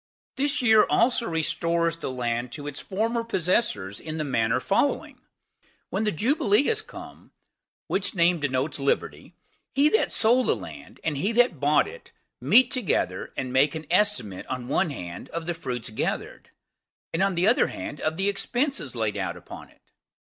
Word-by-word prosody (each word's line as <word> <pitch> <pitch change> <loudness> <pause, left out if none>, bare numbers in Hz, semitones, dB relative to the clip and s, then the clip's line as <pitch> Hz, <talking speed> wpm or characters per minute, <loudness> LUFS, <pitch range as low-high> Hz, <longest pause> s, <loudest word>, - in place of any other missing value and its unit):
This 280 0 +1
year 220 -3 +6
also 235 0 +2
restores 170 0 0
the - - -5
land 120 -1 -2
to 145 - -7
its 145 -1 -5
former 230 +4 -1
possessors 175 - 0
in 155 0 -6
the 155 - -1
manner 125 -3 +1
following:When 200 - -3
the 210 - +2
Jubilee 245 - +2
is 435 -1 +2
come, 435 - -12 0.5
which 195 +1 -1
name 170 0 +3
denotes 140 +1 -1
liberty, 140 0 -2 0.4
he 285 +2 +5
that 440 - +1
sold 245 +3 +3
the - - +3
land, - - -11
and 150 -3 -1
he 195 +10 0
that 240 - +3
bought 145 +2 +3
it, 475 +3 -12 0.3
meet 255 0 +5
together, 180 - -1
and 130 -1 -3
make 140 +4 +3
an 160 0 -6
estimate, 155 - +1
on 125 -1 -4
one 170 +6 +1
hand, 90 -11 -7
of 165 0 -5
the 175 - -1
fruits 125 -9 -5
gathered; 110 - -4 0.6
and, 165 - 0
on 195 -1 +2
the 175 +2 +1
other 240 +6 +4
hand, 150 - -7
of 155 +1 -1
the 195 +1 0
expenses 240 - -1
laid 110 -3 -1
out - - -3
upon - - -11
it. - - -26
170 Hz, 170 wpm, -25 LUFS, -, 0.6 s, year